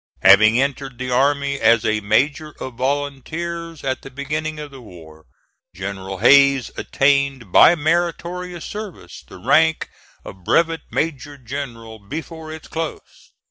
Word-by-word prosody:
Having 110 +5 +7
entered 135 -2 -2
the 130 0 -4
army 140 +2 +1
as 115 0 +4
a 110 0 +1
Major 140 +9 0
of 130 - -6
Volunteers 145 +6 -4
at 130 -2 -2
the - - -10
beginning 150 +3 -4
of 150 -1 -8
the 135 -2 -12
war, 80 -7 -14 0.5
General 95 +1 -6
Hayes 140 +3 +5
attained 135 -6 0
by 170 - +7
meritorious 175 +2 -2
service 205 - -8
the - - -12
rank 160 - +2 0.3
of 95 -1 -11
Brevet 165 - +2
Major 145 -2 -3
General 115 -4 -7
before 160 - -8
its 160 -1 -9
close. 160 -1 -7
140 Hz, 135 wpm, -20 LUFS, 115-155 Hz, 0.5 s, Having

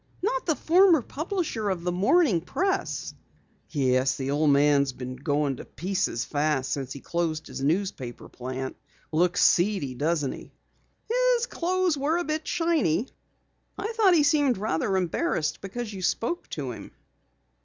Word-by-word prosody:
"Not - - -1
the 320 - +2
former 345 -3 +5
publisher 310 - -3
of 180 -3 -2
the 180 - 0
Morning 200 - +3
Press!" 380 - -2 0.6
"Yes, 130 -3 +2
the 135 0 -2
old 150 +1 +2
man's 140 -1 +4
been 125 0 -6
going 145 0 -1
to - - -9
pieces 180 -9 -2
fast 145 -3 0
since 135 -2 -3
he 140 - -7
closed 165 -2 -2
his - - -7
newspaper 150 -5 -2
plant. 130 +1 -6 0.3
Looks 175 +3 +2
seedy, 175 -7 +2
doesn't 145 +1 0
he?" - - -10 0.5
"His - - +2
clothes 365 -6 0
were 300 +5 +1
a 350 - 0
bit 310 -1 -3
shiny. 320 - +1 0.7
I 435 +3 -3
thought 400 -5 +5
he 305 - +5
seemed 285 -4 +3
rather 195 -1 0
embarrassed 165 -3 -1
because 215 +3 -5
you 190 - -6
spoke 235 - -1
to - - -4
him." - - -9
185 Hz, 150 wpm, -26 LUFS, -, 0.7 s, former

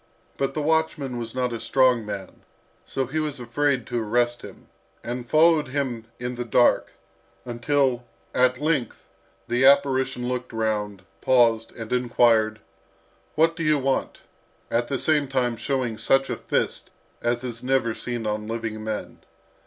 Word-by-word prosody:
But 135 0 -2
the 155 - -1
watchman 150 -5 0
was 115 0 -6
not 125 -2 -1
a 115 - -4
strong 125 -2 +3
man, 100 -2 -7 0.5
so 135 - -2
he 145 +6 -3
was 150 -3 -3
afraid 135 0 0
to 120 -1 -2
arrest 120 +2 0
him, - - -12 0.4
and 120 0 -5
followed 155 -1 +4
him 130 -4 -3
in 125 0 -3
the 120 0 -4
dark, 120 +1 +3 0.5
until, 125 0 0 0.3
at 125 0 +3
length, 150 -6 -2 0.3
the 120 +2 +1
apparition 135 -2 +4
looked 125 -1 -4
round, 105 -3 -2 0.2
paused, 115 -3 +3
and 115 0 -5
inquired, 115 -3 +2 0.7
"What 165 +2 +3
do 165 - -6
you 155 -2 +3
want?" 135 -1 -1 0.5
at 120 +1 +1
the 140 - -1
same 150 0 +2
time 125 -3 0
showing 120 -2 -2
such 135 +4 +2
a - - -1
fist - - -2 0.3
as 120 +1 -1
is 120 -1 -5
never 130 -3 +1
seen 120 0 -4
on 105 0 -2
living 110 -1 -4
men. 110 -1 -5
125 Hz, 155 wpm, -24 LUFS, 115-135 Hz, 0.7 s, followed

